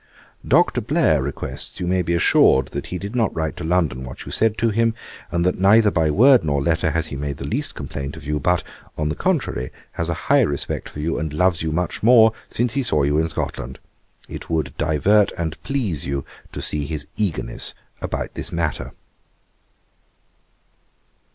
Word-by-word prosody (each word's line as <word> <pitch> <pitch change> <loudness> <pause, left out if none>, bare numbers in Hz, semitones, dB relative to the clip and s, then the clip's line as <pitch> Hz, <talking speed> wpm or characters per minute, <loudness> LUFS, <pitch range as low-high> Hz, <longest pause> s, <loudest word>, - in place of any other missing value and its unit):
'Dr. - - +3
Blair 75 -3 +2
requests 70 +1 -5
you 90 - -2
may 90 +1 +1
be 85 0 0
assured 65 -5 +4
that - - -5
he 90 - -4
did 100 +6 -6
not 115 -4 +2
write 80 -1 -2
to - - -7
London 80 -7 0
what 65 0 -8
you - - -7
said 110 -1 +1
to 115 -1 +1
him, 115 +1 +1 0.3
and 85 0 0
that 90 - +1
neither 105 +2 +5
by 80 -4 +2
word 125 - +6
nor 70 -2 0
letter 80 +2 +1
has 80 +1 0
he - - -5
made 70 0 -4
the - - -6
least - - -2
complaint 70 +2 -6
of 80 - -11
you; 75 +1 -1
but, 90 +3 +1 0.3
on 75 0 -1
the 75 - -2
contrary, 65 -2 -1 0.2
has 85 0 -3
a 85 - 0
high 145 0 +5
respect 70 - -2
for - - -9
you, 80 +2 -1
and 80 -1 -3
loves 85 +1 +2
you 80 -1 -1
much 90 +3 -2
more 115 -1 +6 0.2
since 120 0 -1
he 140 - +1
saw 75 - +1
you 75 +2 +2
in 80 +1 0
Scotland. 65 -4 -4 0.5
It - - -8
would 80 -2 -1
both - - -36
divert 100 +7 +3
and 80 -3 -4
please 105 - -2
you 70 0 -2 0.3
to - - -6
see 75 -2 -1
his 75 -2 -4
eagerness 90 - -1 0.3
about - - -3
this - - -6
matter.' 85 -2 -2
80 Hz, 195 wpm, -21 LUFS, 75-100 Hz, 0.5 s, word